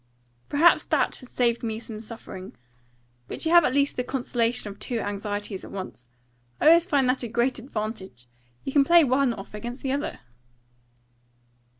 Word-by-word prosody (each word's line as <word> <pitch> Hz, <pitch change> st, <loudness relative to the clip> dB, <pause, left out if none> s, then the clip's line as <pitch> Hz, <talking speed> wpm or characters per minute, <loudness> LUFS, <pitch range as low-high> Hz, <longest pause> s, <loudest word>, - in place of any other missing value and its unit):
"Perhaps 320 Hz, +4 st, +5 dB
that -, -, +1 dB
has 255 Hz, -, -12 dB
saved 240 Hz, -1 st, +1 dB
me 220 Hz, -2 st, -3 dB
some 225 Hz, -2 st, -8 dB
suffering. 215 Hz, -, -9 dB, 0.7 s
But -, -, -4 dB
you 320 Hz, -, +1 dB
have 345 Hz, -1 st, +8 dB
at -, -, +2 dB
least 280 Hz, 0 st, +2 dB
the 250 Hz, -, 0 dB
consolation 245 Hz, -3 st, -1 dB
of 200 Hz, -, -13 dB
two 245 Hz, -, -3 dB
anxieties 205 Hz, -1 st, -4 dB
at -, -, -9 dB
once. 185 Hz, -11 st, -8 dB, 0.5 s
I -, -, +6 dB
always 335 Hz, +1 st, +6 dB
find 280 Hz, -6 st, +2 dB
that 255 Hz, +1 st, +2 dB
a 240 Hz, -, -2 dB
great 240 Hz, +3 st, 0 dB
advantage. 215 Hz, -, -6 dB, 0.4 s
You -, -, -4 dB
can 285 Hz, -, +6 dB
play 340 Hz, +3 st, +6 dB
one 265 Hz, -1 st, +2 dB
off 200 Hz, -3 st, -8 dB
against 240 Hz, +5 st, -7 dB
the 265 Hz, -, -1 dB
other." 280 Hz, +1 st, -3 dB
240 Hz, 175 wpm, -26 LUFS, 210-275 Hz, 0.7 s, have